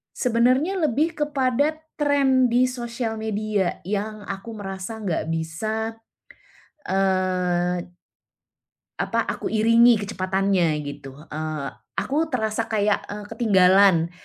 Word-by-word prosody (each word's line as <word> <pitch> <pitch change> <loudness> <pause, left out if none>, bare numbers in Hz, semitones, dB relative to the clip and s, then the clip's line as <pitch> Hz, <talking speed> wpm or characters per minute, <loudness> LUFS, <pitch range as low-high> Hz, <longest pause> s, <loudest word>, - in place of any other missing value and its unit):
Sebenarnya 255 +9 +2
lebih 315 -1 +1
kepada 290 +1 0 0.2
trend 275 -4 +3
di 250 +2 +4
sosial 235 -2 -4
media 215 -3 -1
yang 210 +1 -3
aku 200 +4 -6
merasa 200 0 -6
enggak 185 -7 -2
bisa, 215 +8 -3 0.9
eee 180 -2 0 1.0
Apa, - - 0
aku - - -3
iringi 230 +2 +5
kecepatannya 190 -4 0
gitu. 135 -2 -8 0.2
Eee, 155 -2 -3 0.3
aku 310 +4 0
terasa 220 -5 -1
kayak, 210 -2 +1
eee, 205 0 -7
ketinggalan. 190 -5 +4
215 Hz, 100 wpm, -23 LUFS, 185-245 Hz, 1.0 s, iringi